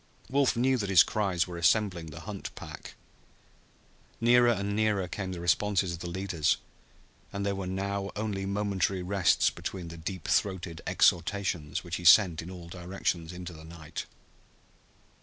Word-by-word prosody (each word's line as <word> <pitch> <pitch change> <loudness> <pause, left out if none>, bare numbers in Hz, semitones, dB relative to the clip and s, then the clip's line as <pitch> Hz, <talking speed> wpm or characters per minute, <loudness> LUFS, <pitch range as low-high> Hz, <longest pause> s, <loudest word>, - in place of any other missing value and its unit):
Wolf 140 -1 +3
knew 130 +2 +2
that 100 -2 -2
his 95 -4 +8
cries 95 -5 0
were 90 -2 -7
assembling 90 -2 +2
the 80 +1 -9
hunt 100 +3 -6
pack. - - -9 1.2
Nearer 120 +1 +5
and 100 -2 0
nearer 105 -3 +1
came 95 +1 -4
the 90 - -5
responses 95 +1 +1
of 85 - -6
the 85 - -5
leaders, 90 -4 0 0.7
and 100 0 -3
there 100 - 0
were 95 -1 -4
now 100 +1 -2
only 105 -2 -2
momentary 100 -2 0
rests 95 -1 +3
between 90 -3 -6
the 85 - -9
deep 90 +1 -5
throated 90 -4 0
exhortations 85 -3 +1
which 85 -1 -4
he 90 - -8
sent 85 -2 +6
in 85 - -9
all 90 -2 -9
directions 85 -1 -3
into 90 -1 -7
the 80 0 -12
night. 80 -1 -8
95 Hz, 160 wpm, -29 LUFS, 85-100 Hz, 1.2 s, his